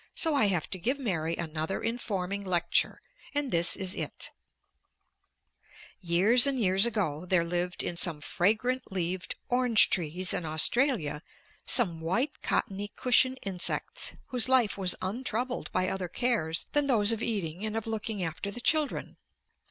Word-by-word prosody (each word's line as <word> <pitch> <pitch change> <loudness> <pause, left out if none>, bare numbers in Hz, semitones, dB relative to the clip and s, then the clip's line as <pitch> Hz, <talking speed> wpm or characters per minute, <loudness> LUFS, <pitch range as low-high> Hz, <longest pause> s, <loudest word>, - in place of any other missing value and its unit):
So 320 -2 0
I 275 -7 +3
have 180 -6 0
to 185 - -3
give 250 +10 -1
Mary 170 - -2
another 160 +1 -4
informing 200 -4 -3
lecture, 175 -3 0 0.3
and 290 -3 0
this 170 0 +5
is 190 -1 +1
it: - - -5 1.7
"Years 200 +9 +5
and 270 -2 -1
years 195 +1 +3
ago, 185 -9 -2
there 180 -2 +2
lived 175 +1 -1
in 175 - -3
some 170 -3 -3
fragrant 220 - -1
leaved 180 0 -3
orange 245 -3 +3
trees 175 +1 +1
in - - -2
Australia 160 - +2 0.5
some 180 -10 +4
white 210 - -2
cottony 205 -2 -1
cushion 255 +3 +2
insects 185 -3 -2
whose 250 0 +2
life 255 -5 +3
was 190 -2 +1
untroubled 245 +4 -3
by 185 0 0
other 190 -1 -3
cares 175 -6 -1
than 290 -1 +2
those 220 -5 +4
of 225 -1 0
eating 190 -6 -3
and 220 0 -3
of 225 - -4
looking 220 -3 -3
after 165 +3 -4
the 205 - -6
children. 305 +3 0
195 Hz, 150 wpm, -28 LUFS, 175-240 Hz, 1.7 s, this